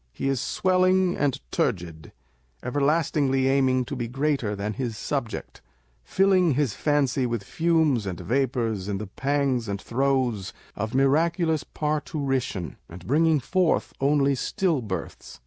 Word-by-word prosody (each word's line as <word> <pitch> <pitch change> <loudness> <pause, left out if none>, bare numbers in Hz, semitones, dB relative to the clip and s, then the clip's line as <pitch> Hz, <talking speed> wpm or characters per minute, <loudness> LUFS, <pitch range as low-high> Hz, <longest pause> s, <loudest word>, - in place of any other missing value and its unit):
He 135 - -2
is 135 -2 0
swelling 185 0 +2
and 140 -3 0
turgid 85 -3 -2 0.5
â€" - - -6
everlastingly 140 -1 +1
aiming 130 -2 +2
to 145 - -5
be 120 -2 -3
greater 135 -4 -1
than 100 +2 -3
his 120 -2 -4
subject; 135 -4 -4 0.4
filling 185 -5 +3
his 140 -6 +1
fancy 140 -3 +1
with 115 -3 -3
fumes 160 -6 +1
and 90 -3 -4
vapours 115 -6 -1
in 100 -1 -2
the 105 - -5
pangs 135 +2 -1
and 100 -1 -3
throes 125 -5 0 0.2
of 110 +4 -4
miraculous 160 +3 +2
par 150 0 -2
turition, 135 - -3
and 85 +1 -11
bringing 155 +2 +3
forth 180 +6 0
only 140 0 +3
still 165 - 0
births. 100 -5 -6
135 Hz, 140 wpm, -25 LUFS, 115-150 Hz, 0.5 s, filling